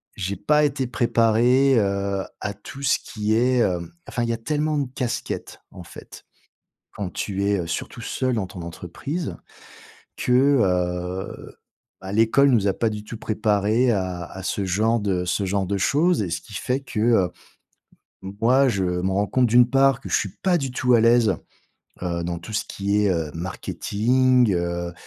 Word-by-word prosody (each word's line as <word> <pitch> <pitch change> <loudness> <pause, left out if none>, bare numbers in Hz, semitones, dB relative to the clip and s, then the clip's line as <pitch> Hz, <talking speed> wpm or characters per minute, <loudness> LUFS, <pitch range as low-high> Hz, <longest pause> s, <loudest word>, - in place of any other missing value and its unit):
j'ai 100 +1 -3
pas 150 +8 +2
été 135 -2 -1
préparé, 120 +3 +3
heu, 100 -1 -1 0.2
à 100 - -3
tout 120 +7 -11
ce 130 - +3
qui 105 -1 -2
est, 125 +1 +2
hem 85 -5 0 0.2
enfin, 120 +1 -2
il 115 - -1
y - - +1
a 115 - -3
tellement 150 +5 -1
de 140 - 0
casquettes, 125 -3 -4
en 90 - -10
fait. 85 - -13 0.7
Quand 100 -3 -4
tu 100 -1 -2
es, 100 -2 +1
heu, 85 - -4
surtout 115 +6 -5
seul 130 +2 -1
dans 95 -4 -2
ton 90 -3 -9
entreprise, 110 - -5 0.8
que, - - -3 0.3
heu, 90 0 -2 0.4
bah, 95 +1 -7
l'école 115 +6 +4
nous 105 -5 +3
a 95 - +3
pas 115 - 0
du 105 -1 -5
tout 115 - -8
préparés 110 +3 +1
à 95 -3 -2
à 95 - -9
ce 100 - -1
genre 110 +5 +1
de 95 -3 -1
ce 90 +3 -1
genre 95 0 0
de 100 +1 -1
choses. 155 - +2
Et 90 - -3
ce - - -2
qui 105 - -13
fait 125 +7 -1
que, 115 -4 -4
heu, 110 -6 +3 0.9
moi, 115 +8 +2
je 100 -6 0
me 90 +1 -1
rends 100 +1 +1
compte 130 +4 +2
d'une 120 +1 +5
part 135 0 +3
que - - -8
je - - +3
suis 100 - -3
pas 185 -2 +3
du 135 -4 -3
tout 125 -1 +2
à 115 - +5
l'aise, 115 -3 +4 0.7
heu, 85 -1 -2
dans 85 0 -3
tout 105 +6 -10
ce 105 - 0
qui 100 +1 -1
est, 100 - +3
heu, 80 -4 -1
marketing, 115 +7 +1
heu, 85 0 -2
105 Hz, 185 wpm, -23 LUFS, 95-125 Hz, 0.9 s, d'une